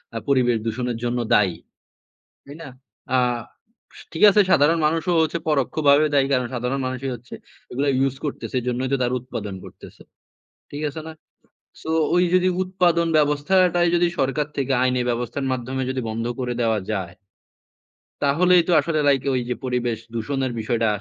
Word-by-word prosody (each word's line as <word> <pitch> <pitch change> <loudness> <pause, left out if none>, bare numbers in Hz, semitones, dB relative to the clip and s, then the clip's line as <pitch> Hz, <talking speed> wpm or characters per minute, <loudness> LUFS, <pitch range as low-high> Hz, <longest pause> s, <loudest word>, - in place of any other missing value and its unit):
আ - - -1
পরিবেশ 125 -4 +2
দূষণের 120 +1 -2
জন্য 120 0 -1
দায়ী। 95 -4 +3 0.9
তাই 140 +1 -11
না? 145 - -8 0.5
আস 125 - -5
ঠিক 165 - -4
আছে, 210 - +4
সাধারণ 160 +2 +4
মানুষও 165 +3 0
হচ্ছে 160 +1 -1
পরোক্ষভাবে 145 +1 +3
দায়ী। 135 -1 +4
কারণ, 125 -2 +1
সাধারণ 125 +3 -2
মানুষই 130 +1 -4
হচ্ছে 120 +1 -13 0.4
এগুলো 140 +3 -1
ইউজ 135 0 +1
করতেছে। 145 - -5
এজন্যই 125 +2 -2
তো - - +3
তারা 125 0 0
উৎপাদন 105 -5 -6
করতেছে। - - -13 0.7
ঠিক 145 +2 -4
আছে 155 +2 -8
না? - - -7 0.7
সোওই 160 +2 +1
যদি 185 0 +4
উৎপাদন 180 -2 +1
ব্যবস্থাটাই 175 +4 +3
যদি 175 0 +3
সরকার 135 +3 0
থেকে 135 -1 -1
আইনি 130 0 +1
ব্যবস্থার 120 +3 -3
মাধ্যমে 130 +1 -3
যদি 130 - -2
বন্ধ 115 +1 -3 0.2
করে 125 -1 -2
দেওয়া 115 -2 +1
যায়। 95 -4 -3 1.1
তাহলেই 175 +5 +4
তো - - +1
আসলে 155 +1 -1
লাইক 135 -2 +3
ওইযে 125 -1 -2
পরিবেশ 125 -3 -1 0.2
দূষণের 130 +3 -2
বিষয়টা 115 +1 0
135 Hz, 150 wpm, -22 LUFS, 125-155 Hz, 1.1 s, আছে